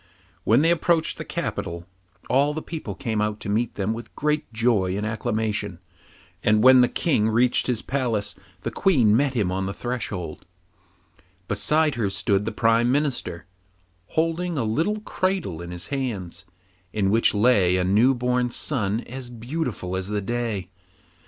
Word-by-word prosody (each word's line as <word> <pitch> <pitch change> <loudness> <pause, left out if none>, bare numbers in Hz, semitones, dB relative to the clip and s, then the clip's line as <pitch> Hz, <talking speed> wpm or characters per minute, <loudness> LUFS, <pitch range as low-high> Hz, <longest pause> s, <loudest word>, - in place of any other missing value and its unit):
When 120 +7 +4
they 165 - +4
approached 170 -1 +1
the - - -3
capital, 85 0 -4 0.4
all 140 +3 +2
the 155 - -4
people 160 -2 -6
came 115 -6 -2
out 105 0 -1
to - - -5
meet 110 +3 0
them 100 +2 -1
with 115 -1 -9
great 150 -2 -1
joy 110 -5 +1
and 105 - -2
acclamation, 105 -3 -2 0.7
and 105 0 +3
when 130 0 +8
the 125 - +4
King 110 -10 +1
reached 120 +3 +2
his 125 -4 -1
palace 115 -7 -1 0.3
the 115 - -2
Queen 125 - +3
met 135 +1 +1
him 100 -6 +1
on 95 +1 -1
the 100 - -4
threshold; 105 -10 -4 1.0
beside 150 +10 +2
her 100 - +1
stood 100 +1 0
the 110 - -1
Prime 115 +1 +3
Minister, 135 - -1 0.6
holding 165 +1 -1
a 130 - +1
little 165 - 0
cradle 185 - -2
in 85 - -7
his 90 0 -5
hands, 115 -11 -3 0.5
in 100 -2 +1
which 115 0 +3
lay 100 -5 +4
a 90 - +1
new 110 +8 +4
born 125 0 0
child 115 -4 0
as 130 0 -8
beautiful 120 - -4
as 95 0 -3
the 105 0 -1
day. 110 -4 -3
115 Hz, 160 wpm, -24 LUFS, 100-135 Hz, 1.0 s, when